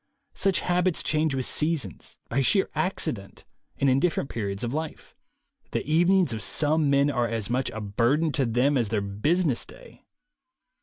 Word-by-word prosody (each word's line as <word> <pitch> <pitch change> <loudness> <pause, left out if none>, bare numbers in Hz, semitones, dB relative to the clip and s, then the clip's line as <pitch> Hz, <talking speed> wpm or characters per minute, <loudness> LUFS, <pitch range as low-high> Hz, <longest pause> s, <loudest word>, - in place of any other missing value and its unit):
Such 195 -3 +1
habits 180 -1 +1
change 155 -2 +1
with 130 -1 -1
seasons, 150 - -2
by 135 - 0
sheer 190 - +2
accident, 105 - -2 0.3
and 140 - +1
in 130 0 +4
different 155 -4 -1
periods 100 -2 -3
of 120 +1 -2
life. 155 +1 -6 0.6
The - - -2
evenings 175 -1 +3
of 110 - -4
some 155 +2 +1
men 140 +1 +3
are 120 -3 0
as 115 -1 -3
much 130 +1 0
a 110 - -6
burden 120 +10 +1
to 140 -4 0
them 125 +4 +2
as 115 -4 0
their 105 -1 0
business 130 - 0
day. - - -15
140 Hz, 165 wpm, -26 LUFS, 115-160 Hz, 0.6 s, in